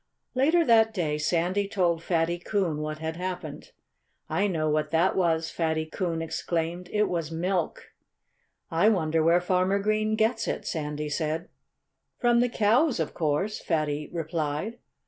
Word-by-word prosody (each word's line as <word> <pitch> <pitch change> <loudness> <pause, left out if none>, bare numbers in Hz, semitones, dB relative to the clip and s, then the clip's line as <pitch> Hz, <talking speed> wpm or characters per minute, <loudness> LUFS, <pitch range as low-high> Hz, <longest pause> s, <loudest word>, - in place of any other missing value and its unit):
Later 315 +6 +3
that 225 -2 +4
day 150 -5 -1
Sandy 180 +6 +1
told 175 -4 +1
Fatty 170 0 0
Coon 180 -4 -1
what 155 0 -3
had 160 +1 -4
happened. 185 - -5 0.6
"I 205 - +1
know 160 -5 -1
what 150 0 +1
that 165 +4 +2
was," 165 -3 +1
Fatty 160 -1 -1
Coon 165 0 -2
exclaimed. 165 +2 -3
"It 210 0 +2
was 165 -3 -2
milk." 175 +1 -2 0.8
"I 170 +6 +4
wonder 165 -6 +1
where 165 +2 +4
Farmer 185 +2 +1
Green 215 +1 +1
gets 225 +1 +1
it," - - -3
Sandy 150 -1 -3
said. 160 +3 -2 0.7
"From 240 -1 +3
the 245 +1 +3
cows, 235 - +2
of 160 - -2
course!" 165 +6 -1
Fatty 150 -2 -1
replied. 160 +5 -3
170 Hz, 145 wpm, -27 LUFS, 160-205 Hz, 0.8 s, that